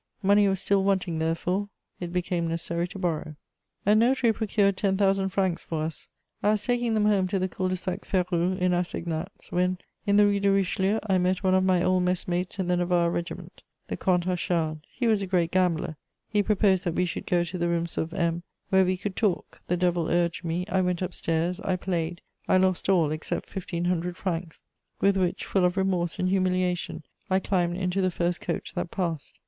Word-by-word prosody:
Money 200 +1 +5
was 195 -1 +1
still 195 +1 +2
wanting, 190 -4 0
therefore; 180 +5 -1 0.3
it 175 -1 -5
became 175 -1 -1
necessary 170 +1 -2
to 180 - -9
borrow. 160 -4 -2 0.5
A 205 - +5
notary 235 +1 +4
procured 205 -3 +1
ten 195 0 +1
thousand 195 -1 +2
francs 190 -2 0
for 160 -2 -3
us: 160 -1 -5 0.3
I 205 - +2
was 210 -1 -1
taking 240 -1 +1
them 210 -1 +2
home 200 -3 +3
to 195 - -1
the 185 0 0
Cul 185 0 -2
de 185 - 0
sac 185 +2 -4
Férou, 180 -1 0
in 180 0 +2
assignats, 175 0 -3
when, 180 +1 +1 0.3
in 200 - +4
the 205 - +7
Rue 200 0 +2
de 200 0 +2
Richelieu, 195 +1 +2
I 190 -3 +2
met 185 +2 0
one 185 -1 +3
of 185 0 +4
my 185 -2 +3
old 185 0 +3
messmates 180 +1 -1
in 190 -2 -1
the 180 0 +2
Navarre 175 -1 +2
Regiment, 170 +1 -5 0.3
the - - -2
Comte 180 -2 +1
Achard. 170 -3 -1
He 250 - -3
was 220 -3 +3
a 195 - -3
great 175 -2 +1
gambler; 175 -4 +1 0.3
he 210 -1 +2
proposed 200 -3 +2
that 170 -1 -1
we 180 - +2
should 175 - -5
go 175 -2 +2
to 175 +2 -5
the 170 0 +1
rooms 170 0 -1
of 160 - -2
M, 170 -2 0 0.3
where 190 -1 +5
we 185 0 0
could 190 +1 -4
talk; 205 -6 -1
the 180 - +1
devil 175 -2 +1
urged 170 0 +1
me: 170 +2 -2
I 190 -2 +1
went 180 0 0
upstairs, 170 0 -1
I 185 - -1
played, 175 -2 -2 0.3
I - - +4
lost 185 0 +1
all, 170 -6 +3
except 155 0 -3
fifteen 175 -2 -4
hundred 175 0 -1
francs, 170 -3 -4 0.4
with 200 0 +3
which, 185 -2 0
full 190 - +1
of 180 +1 +2
remorse 185 -3 0
and 185 - 0
humiliation, 185 -3 0 0.3
I 190 - +3
climbed 175 -3 0
into 185 +1 0
the 185 - +2
first 175 0 -1
coach - - -4
that - - -3
passed. 170 -6 -4
180 Hz, 210 wpm, -27 LUFS, 175-195 Hz, 0.5 s, the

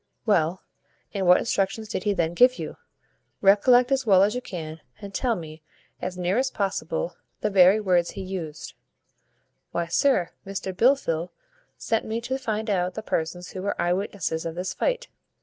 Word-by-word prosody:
"Well, 180 -4 +1 0.5
and 195 -3 -1
what 180 - +8
instructions 215 0 -1
did 185 - -4
he 205 - +2
then 170 -1 0
give 250 +7 +5
you? - - -6 0.6
Recollect 245 +6 +5
as 270 0 +2
well 195 -5 +5
as 205 +2 +2
you 250 - -3
can, 160 -7 -7 0.2
and 200 -1 -9
tell 245 -3 +1
me, 160 -3 -9 0.4
as 180 0 -4
near 180 +5 +1
as 265 0 +1
possible, 245 - -2 0.2
the 210 - 0
very 190 +2 +6
words 180 -4 +2
he 195 - -7
used." 175 -5 -6 1.0
"Why, 170 - -1
sir, 180 0 +2
Mr 190 -1 -5
Blifil 180 - +2 0.5
sent 225 -1 0
me 220 +1 -2
to 260 +3 -3
find 220 -3 -2
out 185 -3 0
the 220 - -5
persons 175 0 -3
who 185 - -6
were 200 +1 -2
eye 175 0 +2
witnesses 180 -4 -2
of 165 -1 -4
this 180 +1 -3
fight. - - -1
195 Hz, 175 wpm, -25 LUFS, 175-225 Hz, 1.0 s, what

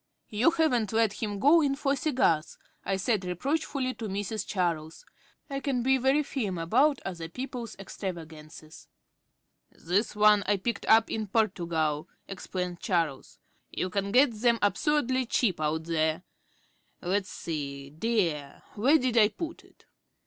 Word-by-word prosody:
"You 220 +8 +4
haven't 305 - +1
let 225 -2 +1
him 205 -2 -2
go 295 +10 +5
in 280 -2 +1
for 280 0 0
cigars?" 255 - +1 0.3
I 195 - -1
said 200 +1 0
reproachfully 255 - -2
to 225 - -6
Mrs. 205 +2 -3
Charles. 165 -5 -2 0.4
I 275 -2 -3
can 265 -3 -1
be 265 +1 +3
very 270 +4 +3
firm 215 -10 -3
about 255 - +2
other 170 -4 -5
people's 250 +1 -6
extravagances. 160 -5 -8 0.8
"This 195 +7 0
is - - -12
one 210 0 +5
I 205 0 +3
picked 235 +5 -3
up 225 0 +5
in 220 -1 -2
Portugal," 170 -8 0 0.2
explained 180 -2 -5
Charles. 165 - -2 0.3
"You 185 - -3
can 200 +1 -1
get 255 +3 +5
them 230 +2 +2
absurdly 260 +3 +1
cheap 205 -8 +1
out 155 +1 0
there. 160 0 0 0.8
Let's 190 +2 0
see, 140 -3 -5
dear; 160 -6 -1
where 260 +9 +4
did 250 -4 +2
I 210 - +7
put 325 +10 -7
it?" - - -24
205 Hz, 145 wpm, -28 LUFS, 170-255 Hz, 0.8 s, I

